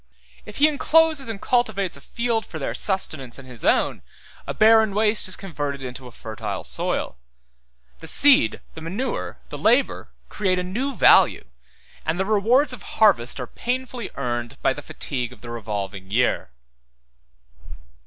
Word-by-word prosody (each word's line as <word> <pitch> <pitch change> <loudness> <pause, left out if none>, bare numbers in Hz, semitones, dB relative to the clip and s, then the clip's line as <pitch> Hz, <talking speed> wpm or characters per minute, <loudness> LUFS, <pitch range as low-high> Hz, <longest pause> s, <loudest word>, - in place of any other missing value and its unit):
If 210 - -8
he 295 - +6
encloses 310 -2 +3
and 220 -3 -5
cultivates 215 -6 0
a 140 - -8
field 235 - -1
for 160 - -8
their 140 - -3
sustenance 155 - 0
and 135 -1 -12
his 125 -3 -8
own, - - +2 0.5
a - - -3
barren 220 -2 +5
waste 210 -1 +3
is 185 - -2
converted 145 -7 -5
into 130 0 -7
a - - -12
fertile 110 -1 -6
soil; - - -1 0.8
the 160 - -9
seed, 285 - +4
the 160 - -10
manure, 195 +11 -4
the - - -7
labor, - - +2 0.2
create 190 -3 0
a 180 - -1
new 245 +9 -3
value, - - +5 0.6
and 160 +3 -2
the 190 - +1
rewards 235 +7 +3
of 240 - -9
harvest 175 - +2
are 125 - -3
painfully 245 - -4
earned 120 -3 -4
by - - +3
the - - -8
fatigues 125 -2 -5
of - - -18
the 120 - -8
revolving 100 -4 -5
year. 120 - +1
190 Hz, 155 wpm, -23 LUFS, -, 0.8 s, he